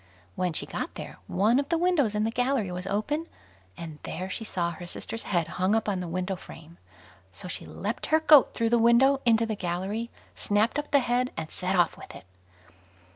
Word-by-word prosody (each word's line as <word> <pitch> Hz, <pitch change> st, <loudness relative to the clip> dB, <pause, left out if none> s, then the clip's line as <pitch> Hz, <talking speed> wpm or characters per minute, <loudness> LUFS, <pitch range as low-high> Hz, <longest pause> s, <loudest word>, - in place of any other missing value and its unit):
When 180 Hz, -1 st, 0 dB
she -, -, -2 dB
got -, -, -5 dB
there, -, -, -8 dB
one 215 Hz, +7 st, +3 dB
of 285 Hz, 0 st, -3 dB
the 335 Hz, -, +2 dB
windows 325 Hz, -, +2 dB
in 210 Hz, -, +1 dB
the 225 Hz, -, 0 dB
gallery 245 Hz, -5 st, 0 dB
was 180 Hz, +1 st, -5 dB
open, 290 Hz, +12 st, -1 dB, 0.5 s
and 160 Hz, -3 st, -8 dB
there 185 Hz, +3 st, -5 dB
she 225 Hz, -, -3 dB
saw 175 Hz, -5 st, -2 dB
her 175 Hz, +1 st, -9 dB
sister's 225 Hz, +6 st, -3 dB
head 170 Hz, -4 st, +1 dB
hung 185 Hz, +4 st, +1 dB
up 225 Hz, -, 0 dB
on 195 Hz, -3 st, 0 dB
the 180 Hz, -, -4 dB
window 185 Hz, +3 st, -2 dB
frame; 165 Hz, -1 st, -13 dB, 0.5 s
so 90 Hz, -, -8 dB
she -, -, -6 dB
leapt 210 Hz, +4 st, -4 dB
her 315 Hz, +1 st, +4 dB
goat 305 Hz, -3 st, +6 dB
through 230 Hz, -1 st, 0 dB
the 240 Hz, -, +4 dB
window 255 Hz, +4 st, +5 dB
into 230 Hz, 0 st, +4 dB
the 220 Hz, -, -2 dB
gallery, 195 Hz, +5 st, -3 dB, 0.3 s
snapped 215 Hz, +7 st, +1 dB
up 295 Hz, -, -5 dB
the 280 Hz, -1 st, +4 dB
head, 245 Hz, +1 st, 0 dB
and 160 Hz, -1 st, -5 dB
set 185 Hz, +1 st, -2 dB
off 175 Hz, -2 st, +3 dB
with -, -, -11 dB
it. -, -, -12 dB
210 Hz, 210 wpm, -27 LUFS, 180-245 Hz, 0.5 s, goat